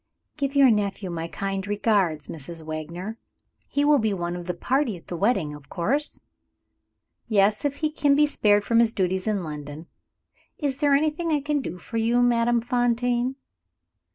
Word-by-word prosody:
"Give 280 Hz, -1 st, -2 dB
your 275 Hz, -3 st, +7 dB
nephew 200 Hz, -3 st, -1 dB
my 165 Hz, -1 st, -4 dB
kind 195 Hz, +4 st, -4 dB
regards, 200 Hz, -7 st, +1 dB
Mrs. 165 Hz, +1 st, -8 dB
Wagner. 170 Hz, +7 st, -6 dB, 0.5 s
He 285 Hz, 0 st, +1 dB
will 295 Hz, -1 st, +5 dB
be 220 Hz, -2 st, 0 dB
one 175 Hz, -1 st, -3 dB
of 175 Hz, 0 st, -7 dB
the 180 Hz, -, -2 dB
party 250 Hz, 0 st, 0 dB
at 165 Hz, -, -17 dB
the 175 Hz, -, -5 dB
wedding, 175 Hz, -6 st, +1 dB
of 145 Hz, -2 st, -13 dB
course?" 265 Hz, -, -2 dB, 1.0 s
"Yes 210 Hz, +1 st, +2 dB
if 285 Hz, -1 st, 0 dB
he 310 Hz, +1 st, -1 dB
can 290 Hz, -2 st, +2 dB
be 300 Hz, +1 st, +5 dB
spared 210 Hz, -8 st, +2 dB
from 230 Hz, +2 st, +2 dB
his 230 Hz, -1 st, +3 dB
duties 190 Hz, +1 st, -1 dB
in 205 Hz, -4 st, 0 dB
London. 150 Hz, 0 st, -7 dB, 0.7 s
Is 280 Hz, -3 st, -2 dB
there 290 Hz, -2 st, +4 dB
anything 310 Hz, +3 st, 0 dB
I 300 Hz, -, +2 dB
can 290 Hz, 0 st, -1 dB
do 180 Hz, -, -6 dB
for 225 Hz, +6 st, -6 dB
you, 235 Hz, +2 st, +2 dB
Madame 240 Hz, 0 st, +3 dB
Fontaine?" 245 Hz, +1 st, 0 dB
220 Hz, 175 wpm, -25 LUFS, 175-270 Hz, 1.0 s, your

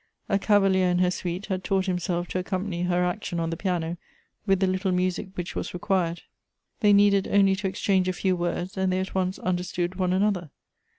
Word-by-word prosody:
A 195 Hz, -, +1 dB
cavalier 195 Hz, -3 st, +3 dB
in 180 Hz, -, +2 dB
her 180 Hz, 0 st, +3 dB
suite 180 Hz, +2 st, -4 dB
had 190 Hz, -2 st, -3 dB
taught 190 Hz, -1 st, +1 dB
himself 180 Hz, -1 st, -1 dB
to 185 Hz, -, -1 dB
accompany 185 Hz, -1 st, -3 dB
her 180 Hz, 0 st, +1 dB
action 180 Hz, -1 st, -3 dB
on 165 Hz, 0 st, -1 dB
the -, -, -2 dB
piano 175 Hz, -2 st, -2 dB, 0.5 s
with 195 Hz, -1 st, +3 dB
the 190 Hz, -, +3 dB
little 185 Hz, +1 st, 0 dB
music 185 Hz, +2 st, 0 dB
which 180 Hz, 0 st, -5 dB
was -, -, -4 dB
required; 175 Hz, -2 st, -1 dB, 0.6 s
they 210 Hz, -2 st, +4 dB
needed 200 Hz, -1 st, +4 dB
only 195 Hz, -1 st, +4 dB
to 195 Hz, 0 st, -2 dB
exchange 190 Hz, -1 st, +1 dB
a 185 Hz, -, +1 dB
few 185 Hz, +1 st, 0 dB
words 175 Hz, +2 st, -3 dB
and 190 Hz, -1 st, +1 dB
they 185 Hz, -, +1 dB
at 190 Hz, -, -4 dB
once 185 Hz, 0 st, 0 dB
understood 180 Hz, -1 st, -2 dB
one 180 Hz, -1 st, +1 dB
another. 185 Hz, -3 st, +1 dB
185 Hz, 200 wpm, -26 LUFS, 180-195 Hz, 0.6 s, they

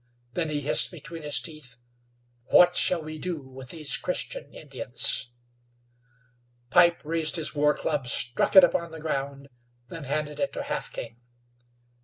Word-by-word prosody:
Then 165 Hz, -3 st, -1 dB
he 150 Hz, -1 st, -2 dB
hissed 145 Hz, -, +4 dB
between 165 Hz, -1 st, -10 dB
his 145 Hz, -4 st, +1 dB
teeth: 135 Hz, -3 st, -7 dB, 0.7 s
"What 175 Hz, +4 st, +5 dB
shall 175 Hz, -3 st, +2 dB
we 155 Hz, 0 st, -7 dB
do 175 Hz, +1 st, -2 dB
with 130 Hz, -1 st, -12 dB
these 155 Hz, -4 st, -1 dB
Christian -, -, -4 dB
Indians?" 135 Hz, -2 st, -2 dB, 1.4 s
Pipe 170 Hz, 0 st, +5 dB
raised 160 Hz, 0 st, +1 dB
his 160 Hz, -3 st, +1 dB
war 150 Hz, 0 st, +2 dB
club, 145 Hz, -5 st, -2 dB
struck 120 Hz, -, +1 dB
it 190 Hz, -, +11 dB
upon 170 Hz, 0 st, +2 dB
the 160 Hz, -, -9 dB
ground; 140 Hz, -2 st, -4 dB, 0.4 s
then 165 Hz, -3 st, -8 dB
handed 150 Hz, +2 st, -3 dB
it 280 Hz, -, -1 dB
to -, -, -4 dB
Half 295 Hz, +1 st, -4 dB
King. 115 Hz, 0 st, -8 dB
155 Hz, 150 wpm, -26 LUFS, 140-170 Hz, 1.4 s, it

